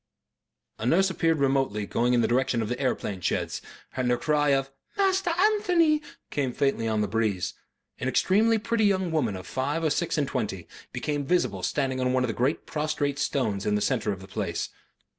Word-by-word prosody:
A 110 - -3
nurse 190 +7 +4
appeared 165 -3 +1
remotely 135 -7 +1
going 120 +4 +1
in 120 - +3
the - - +2
direction 120 -1 +1
of 105 - -4
the 125 - -2
aeroplane 105 -7 -2
sheds, - - -1 0.3
and 130 -1 0
her 125 - +3
cry 150 -1 +1
of 135 -1 +1 0.3
"Master 385 -2 +2
Anthony" 355 -4 +3 0.3
came 135 -4 -1
faintly 135 -5 0
on 110 -1 +1
the 105 - 0
breeze. 105 -3 -1 0.5
An 130 - -2
extremely 215 +11 +3
pretty 225 0 +1
young 190 -3 +1
woman 130 -11 0
of 90 -2 -8
five 145 - -2
or 155 - +2
six 170 +2 0
and 145 -2 +1
twenty 105 -10 -3 0.2
became 145 -1 -2
visible 135 - 0
standing 130 +5 -1
on 125 0 +1
one 130 0 +2
of - - 0
the - - -1
great 130 +6 0
prostrate 150 -2 -1
stones 110 -10 0
in 105 +1 +1
the - - +2
centre 110 -2 0
of 95 -2 -5
the 95 - -11
place. - - -3
135 Hz, 200 wpm, -27 LUFS, 115-165 Hz, 0.5 s, nurse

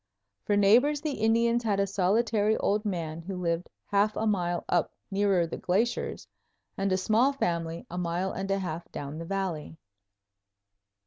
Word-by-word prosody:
For 205 - +2
neighbors 250 +9 +4
the 305 -1 -1
Indians 230 0 +2
had 210 -4 0
a 200 - +3
solitary 210 +3 +2
old 210 +2 0
man, 170 -5 -3
who 190 +3 -6
lived 170 0 -1 0.2
half 205 +1 +2
a 220 - -1
mile 175 -5 0
up 175 -3 +1 0.2
nearer 195 -3 +2
the 165 - -5
glaciers, 210 +7 -1 0.5
and 195 0 -1
a 185 - +3
small 220 +8 +3
family, 170 -9 -2
a 180 - -5
mile 180 +2 -1
and 195 +1 -4
a 195 - +2
half 175 -3 -5
down 145 +2 -6
the 165 - -5
valley. 180 -4 -3
195 Hz, 165 wpm, -28 LUFS, 175-215 Hz, 0.5 s, neighbors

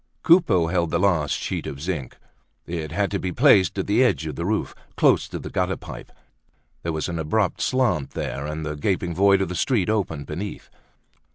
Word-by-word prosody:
Coupeau 160 - +5
held 85 0 0
the 85 - +1
last 85 -6 +2
sheet - - -4
of 70 - -6
zinc. 80 -5 -4 0.5
It 80 -3 -4
had 100 +4 0
to 100 - -1
be 95 - -3
placed 100 - +4
at 95 - -1
the 105 +5 +3
edge 100 -10 +1
of 75 -3 -5
the 85 +2 -3
roof, 110 +1 -1 0.2
close - - +4
to - - -6
the - - -8
gutter - - 0
pipe; - - -10 0.7
there 85 - -2
was 80 -2 -2
an 85 -1 -3
abrupt 90 +5 0
slant 120 - +1
there, 70 +2 -3
and 75 +1 -4
the 75 0 -3
gaping 90 +2 -1
void 100 +2 +4
of 95 - -4
the - - -4
street 110 -2 +1
opened 80 -9 -2
beneath. 90 +9 -6
90 Hz, 200 wpm, -23 LUFS, 80-100 Hz, 0.7 s, Coupeau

